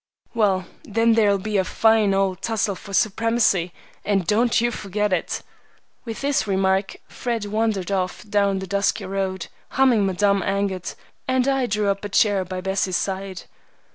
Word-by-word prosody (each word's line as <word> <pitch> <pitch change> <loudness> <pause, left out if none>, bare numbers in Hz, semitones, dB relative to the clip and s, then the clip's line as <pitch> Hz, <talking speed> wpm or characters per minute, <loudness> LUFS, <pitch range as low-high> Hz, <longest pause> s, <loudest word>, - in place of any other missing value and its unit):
"Well, 195 -5 +1 0.2
then 230 +2 +2
there'll 210 -3 +3
be 210 +2 -2
a 190 - +3
fine 220 +1 +3
old 195 -1 0
tussle 215 -2 0
for 195 - -11
supremacy, 215 -3 +2 0.3
and 195 -3 0
don't 230 +3 +2
you 240 +1 +1
forget 210 -1 -2
it!" 175 - -2 0.6
With 225 -2 -6
this 280 -5 0
remark 190 0 +1
Fred 235 -4 -3
wandered 210 -3 -1
off 185 +1 -2
down 200 -1 +1
the 190 - -4
dusty 200 +2 0
road, 190 -1 -3 0.3
humming 245 -7 +4
Madame 200 +1 +2
Angot, 195 -2 -2 0.3
and 260 0 +1
I 270 -2 +1
drew 210 -1 0
up 195 +1 -5
a 205 - -4
chair 200 -1 +3
by 185 0 -5
Bessie's 190 -1 0
side. 190 -2 -4
200 Hz, 160 wpm, -22 LUFS, 190-220 Hz, 0.6 s, humming